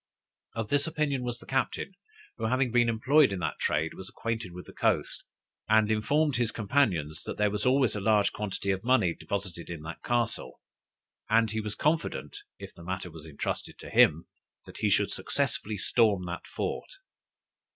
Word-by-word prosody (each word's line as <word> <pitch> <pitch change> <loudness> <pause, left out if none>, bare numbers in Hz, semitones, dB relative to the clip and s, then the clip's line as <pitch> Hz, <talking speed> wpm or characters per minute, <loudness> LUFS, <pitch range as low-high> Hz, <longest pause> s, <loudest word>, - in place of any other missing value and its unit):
Of 115 -2 -3
this 145 +2 +2
opinion 150 -4 0
was 120 -1 -3
the - - -15
captain, 135 +8 -1 0.4
who - - -2
having 130 +2 +1
been 120 0 +4
employed 130 +4 +4
in 100 - -2
that 80 - -2
trade, 80 +1 0
was 95 0 -9
acquainted 115 -5 -3
with 90 +1 -9
the - - -13
coast; - - 0 0.5
and 110 0 +4
informed 140 +6 +2
his 120 -2 +1
companions, 95 - +1
that - - -6
there 105 -1 +2
was 105 +3 -1
always 130 -2 +3
a 105 - -3
large 105 -1 +3
quantity 100 -1 -2
of 95 +1 -2
money 115 -9 +3
deposited 95 -4 -5
in 85 -3 -6
that 80 +1 -7
castle, 120 - -1 0.7
and 110 -1 +4
he 110 0 -1
was 105 -1 -5
confident, 150 - -1 0.2
if - - -10
the 85 - -13
matter 95 0 -4
was 80 0 -11
entrusted 75 - -4
to - - -10
him, 80 +3 +5 0.5
he - - +2
should - - +2
successfully 105 0 -2
storm 105 -2 +3
that 85 0 -6
fort. - - -3
110 Hz, 175 wpm, -29 LUFS, 90-125 Hz, 0.7 s, him